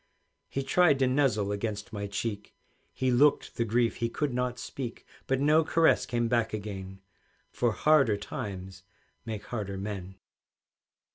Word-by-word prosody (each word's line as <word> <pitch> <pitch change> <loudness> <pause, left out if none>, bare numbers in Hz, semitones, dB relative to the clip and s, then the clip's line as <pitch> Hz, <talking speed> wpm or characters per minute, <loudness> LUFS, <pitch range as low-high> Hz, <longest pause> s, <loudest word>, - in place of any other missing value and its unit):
He 135 - -2
tried 160 0 +4
to 135 - +3
nuzzle 125 -7 +2
against 105 0 -4
my 100 -1 -3
cheek, 100 +1 -4 0.4
He 130 -1 0
looked 140 +4 +3
the 115 - +1
grief 115 +1 +1
he 115 -1 -1
could 140 +2 -2
not 125 0 -1
speak; 125 -1 -6 0.2
But 135 0 +1
no 150 +3 +4
caress 165 +1 +3
came 120 -1 0
back 115 -2 +1
again, 95 -2 -6 0.5
For 120 -1 +1
harder 135 -9 +4
times 95 -4 -6 0.5
make 110 -2 -4
harder 100 -5 -4
men. 95 -2 -5
115 Hz, 145 wpm, -29 LUFS, 100-130 Hz, 0.5 s, tried